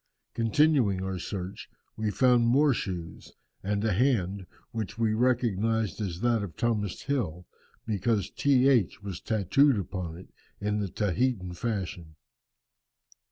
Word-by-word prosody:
Continuing 115 -4 +2
our 95 -1 -3
search, 95 +1 -6 0.3
we 110 -1 -1
found 125 +1 +4
more 140 +4 +4
shoes, 90 -7 -6 0.3
and 100 +2 -1
a 110 - +2
hand, 100 -5 +1 0.2
which 110 -1 -4
we 110 -2 +1
recognized 115 -3 +1
as 90 -3 -4
that 120 -2 +2
of 100 -5 -7
Thomas 105 -5 -1
Hill, 90 - -2 0.4
because 105 -1 0
T. 135 -2 +3
H. 115 -7 +2
was 95 -4 -6
tatooed 120 - +3
upon 90 -3 -5
it 90 - -14 0.3
in 105 0 -1
the 100 -2 -2
Tahitan 100 0 -1
fashion. 90 -6 -4
105 Hz, 130 wpm, -28 LUFS, 95-120 Hz, 0.4 s, found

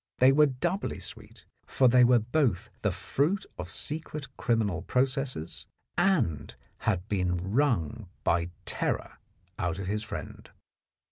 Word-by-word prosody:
They 130 +1 +7
were 150 +2 +6
doubly 140 +9 -2
sweet, - - -10 0.2
for 130 - +4
they 125 +1 +6
were 125 0 +6
both 115 - 0
the 105 - +2
fruit 140 - 0
of 90 -1 -5
secret 150 - -4
criminal 110 -8 0
processes 130 - -1 0.3
and 165 - +1 0.3
had 95 -2 0
been 90 -2 -1
wrung 115 - +1
by 85 +1 +2 0.2
terror - - -1 0.4
out 85 -1 -1
of 100 - -4
his 105 +3 -1
friend. 110 - -7
115 Hz, 130 wpm, -29 LUFS, 90-135 Hz, 0.4 s, They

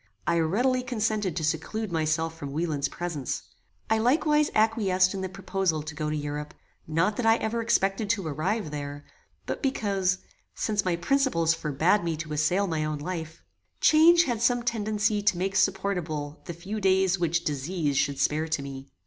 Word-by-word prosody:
I 170 - +2
readily 245 +11 +2
consented 215 -6 -1
to 165 - -2
seclude 170 +7 -2
myself 160 0 0
from 145 -3 -7
Wieland's 150 -3 -1
presence. 170 -7 -4 0.4
I 220 0 +2
likewise 300 +5 +3
acquiesced 205 -4 +3
in 195 - -4
the 190 - -3
proposal 190 -4 -1
to 155 0 -7
go 155 0 -3
to 155 - -1
Europe; 150 0 -4 0.3
not 165 +7 +1
that 245 - -1
I 225 - +6
ever 230 0 -2
expected 200 -2 +1
to 205 -5 0
arrive 160 +4 -2
there, 145 -1 -6 0.4
but - - -4
because, 200 -9 0 0.4
since 210 -2 0
my 180 -2 +1
principles 175 - +2
forbad 160 +7 +1
me 165 -2 -1
to 155 -1 -5
assail 165 +7 +2
my 160 -4 -1
own 155 0 -2
life, 160 +1 -6 0.4
change 335 +2 +6
had 240 -8 -2
some 245 0 +2
tendency 215 -2 0
to 205 -3 +2
make 190 +2 -2
supportable 175 -6 -1
the 170 - -5
few 200 +6 -5
days 190 -1 +3
which 170 0 +1
disease 150 +1 -1
should 140 0 +1
spare 150 +3 +1
to 155 -3 -2
me. 135 0 -8
180 Hz, 175 wpm, -27 LUFS, 155-215 Hz, 0.4 s, I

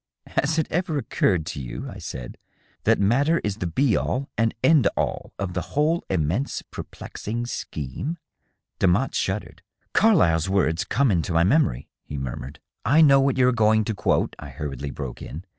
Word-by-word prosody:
" - - -58 0.2
Has 155 +3 0
it 160 - +2
ever 165 -2 0
occurred 90 - +1
to 75 - -5
you," 60 - -6
I - - -8
said, 60 -2 -7 0.5
"that - - +4
matter 135 +11 +3
is 105 -1 -2
the 90 - -2
be 125 - +2
all 135 +2 -1
and 115 0 +1
end 145 -2 +5
all - - -2
of 95 -2 -3
the 90 +9 -5
whole 160 +3 +2
immense, 95 - -1
perplexing 115 +3 -6
scheme?" 120 - -4 0.6
Demotte 95 +8 +2
shuddered. 95 +2 -2 0.2
" - - -44
Carlyle's 95 - +4
words 90 -4 +1
come 135 0 +2
into 85 -1 0
my 85 0 +4
memory," 95 - +2 0.2
he 75 - -7
murmured.. 65 +2 -6
• - - -61 0.2
"I 145 +8 +5
know 140 -3 +7
what 135 -1 +2
you 125 -1 +5
are - - +5
going 110 -1 +3
to 110 - -1
quote," 100 - 0
I - - -8
hurriedly 70 -1 -5
broke 70 -3 -6
in. 80 +6 -8
105 Hz, 185 wpm, -24 LUFS, 80-140 Hz, 0.6 s, know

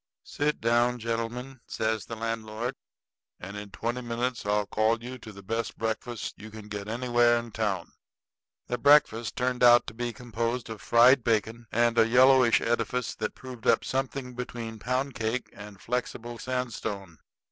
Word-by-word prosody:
"Sit 150 +1 -1
down, 120 +2 +2
gentlemen," 115 +3 -4
says 110 -1 -2
the 115 - -5
landlord, 115 +1 -3 0.7
"and 100 +3 -8
in 105 0 -7
twenty 120 +5 -3
minutes 120 -1 -3
I'll 105 0 +2
call 110 +3 +1
you 125 +1 -7
to 110 - -10
the 100 -1 -12
best 115 +4 -3
breakfast 115 0 -3
you 110 +2 -9
can 110 -1 -11
get 105 -1 -5
anywhere 120 +1 +3
in 115 0 -5
town." 100 -6 -2 0.7
That 125 - -3
breakfast 140 -6 +4
turned 125 0 -1
out 120 -1 +7
to - - -7
be 120 +1 -3
composed 115 0 -3
of 110 -1 -7
fried 120 +2 +6
bacon 115 +1 0
and 120 0 +3
a 115 - +6
yellowish 125 0 +6
edifice 120 +1 -1
that - - -3
proved 125 -3 -9
up - - +4
something 135 -1 -3
between 120 -2 -6
pound 130 +4 -1
cake 115 +3 -2
and 105 -1 -11
flexible 120 0 -4
sandstone. 110 -8 -4
115 Hz, 160 wpm, -28 LUFS, 110-125 Hz, 0.7 s, out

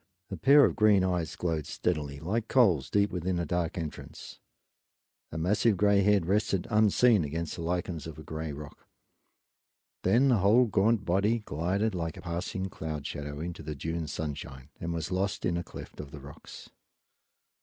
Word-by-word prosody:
A - - -2
pair 140 - +6
of - - 0
green 105 -3 +4
eyes 90 -3 -1
glowed 80 -4 -2
steadily 75 -5 -2
like 105 +9 -2
coals 90 - +3
deep 100 0 +2
within 90 +1 -2
the 85 -1 -1
dark 85 -1 -2
entrance; 80 -3 -7 0.9
a 80 - -5
massive 100 +5 +2
gray 100 +1 +4
head 100 -3 +3
rested 100 0 +1
unseen 110 -1 +4
against 80 +2 -3
the - - -7
lichens 85 -2 -3
of 80 -2 -9
a 80 - -9
gray 80 0 -5
rock; 70 +1 -10 1.1
then 120 +9 +3
the 125 - +4
whole 105 +6 +5
gaunt 105 0 +2
body 100 +6 +2
glided 95 +8 -1
like 85 -3 -3
a - - -8
passing 90 +2 -3
cloud 80 -5 -6
shadow 75 0 -5
into 85 +1 -5
the 75 -1 -5
June 80 +2 -3
sunshine 70 -3 -6
and 85 - -3
was 85 0 -3
lost 95 +2 -1
in 85 - +1
a 85 - -2
cleft - - -11
of 75 - -7
the 75 - -10
rocks. 70 0 -12
85 Hz, 175 wpm, -29 LUFS, 80-100 Hz, 1.1 s, pair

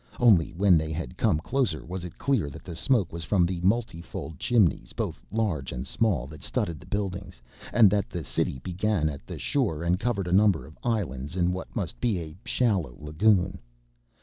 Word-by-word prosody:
Only 105 -10 +5
when 90 -1 +5
they 80 0 -3
had 80 -5 -4
come - - +2
closer 110 - -1
was 90 +1 -5
it 90 - -8
clear 135 - +1
that 70 - -10
the 85 - -7
smoke 105 - +1
was 85 0 -4
from 90 0 +3
the 90 -1 -2
multifold 95 - -2
chimneys, 110 -9 +2
both - - -3
large 100 -11 -1
and 60 - -4
small, 95 - +1
that 75 +1 -11
studded 80 +2 -2
the 90 - -15
buildings, 95 -3 -3 0.3
and 115 -3 +7
that 100 -1 +1
the 85 -4 -4
city 65 - -1
began 95 -2 0
at 70 -5 -8
the - - -6
shore 100 - 0
and 90 +2 +1
covered 110 -4 -1
a 90 - -3
number 95 -8 +4
of 80 +3 -14
islands 80 - -2
in 90 -1 +2
what 90 - -7
must 100 -8 -3
be 115 -6 +2
a 80 -2 -6
shallow 95 - 0
lagoon. 90 +6 +2
90 Hz, 195 wpm, -27 LUFS, 80-105 Hz, 0.3 s, and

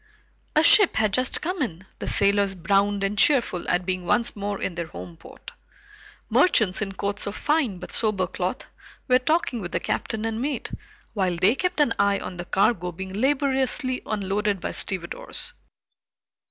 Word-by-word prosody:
A 310 - +5
ship 405 +3 +6
had 215 -2 +1
just 255 +3 +1
come 360 +2 -3
in, 190 - -3
the - - -5
sailors 200 -1 +2
browned 200 +3 +1
and 195 +1 0
cheerful 230 -6 +2
at 180 0 +1
being 185 -1 -2
once 235 +7 +1
more 205 -1 -3
in 185 - -3
their 170 -1 -4
home 170 +1 -9
port. - - -13 0.8
Merchants 220 - +3
in 195 -2 -3
coats 200 +2 -3
of 200 - -4
fine 295 - 0
but 180 - -9
sober 215 -4 +1
cloth 180 +1 -4 0.4
were 255 -1 +5
talking 260 -4 0
with 175 -1 -6
the - - +1
captain 220 0 -2
and 225 0 -2
mate, 275 -1 -3 0.4
while 190 -4 0
they 185 +6 +3
kept 360 +4 -2
an 290 -6 +3
eye 200 0 +3
on 180 - -7
the 175 - -5
cargo 190 -2 +1
being 190 +2 -7
laboriously 265 -2 +1
unloaded 205 -1 -1
by - - -4
stevedores. 180 -3 -4
205 Hz, 170 wpm, -24 LUFS, 185-255 Hz, 0.8 s, ship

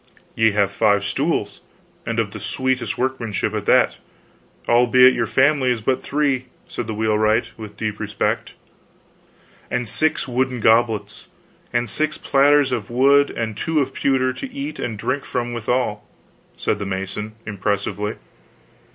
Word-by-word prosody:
"Ye 110 -1 +3
have 100 -2 +2
five 100 -1 +2
stools, 100 - -1 0.5
and - - -2
of - - -1
the - - -8
sweetest 130 -1 -1
workmanship 125 -5 -2
at - - -4
that, - - +4 0.7
albeit 125 +2 +6
your - - -1
family 135 -1 +3
is 120 -3 -1
but 130 +3 +1
three," 140 -3 0 0.2
said 120 - -5
the 110 - -4
wheelwright, 110 +1 +1
with 105 -2 -10
deep 110 -2 -3
respect. - - -2 1.1
"And 125 -1 -2
six 155 +6 0
wooden 125 0 -1
goblets, 110 -2 +1 0.4
and 120 0 0
six 155 +7 0
platters 140 0 +3
of 115 -5 -3
wood 140 +4 +4
and 110 -2 -4
two 160 +6 0
of 135 -2 -1
pewter 130 -2 +1
to 265 - -7
eat 280 +3 -6
and 115 -3 -3
drink 135 +6 -2
from 120 -1 -3
withal," 115 -2 -1 0.5
said 105 - -1
the 100 - -3
mason, 95 +3 -4
impressively. 105 0 -2
120 Hz, 145 wpm, -21 LUFS, 105-130 Hz, 1.1 s, albeit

